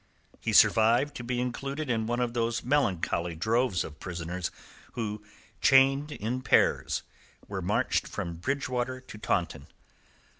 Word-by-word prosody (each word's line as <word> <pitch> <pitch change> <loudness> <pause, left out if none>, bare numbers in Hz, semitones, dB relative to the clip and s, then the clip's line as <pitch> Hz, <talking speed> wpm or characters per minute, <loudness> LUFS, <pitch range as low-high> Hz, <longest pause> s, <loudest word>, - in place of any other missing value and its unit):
He - - -2
survived 115 +6 +5
to 120 - -6
be 120 0 -2
included 135 +4 -3
in 110 -3 0
one 120 +1 -1
of 120 -1 -1
those 120 0 -1
melancholy 90 - 0
droves 110 +2 +1
of 75 - -10
prisoners 85 0 -4 0.4
who, 105 -3 -4 0.4
chained 135 +2 +5
in 125 0 -3
pairs, 120 - +2 0.4
were - - -4
marched - - 0
from 85 -1 -5
Bridgewater 130 +3 -2
to 130 -4 -11
Taunton. - - -1
120 Hz, 135 wpm, -28 LUFS, 100-130 Hz, 0.4 s, survived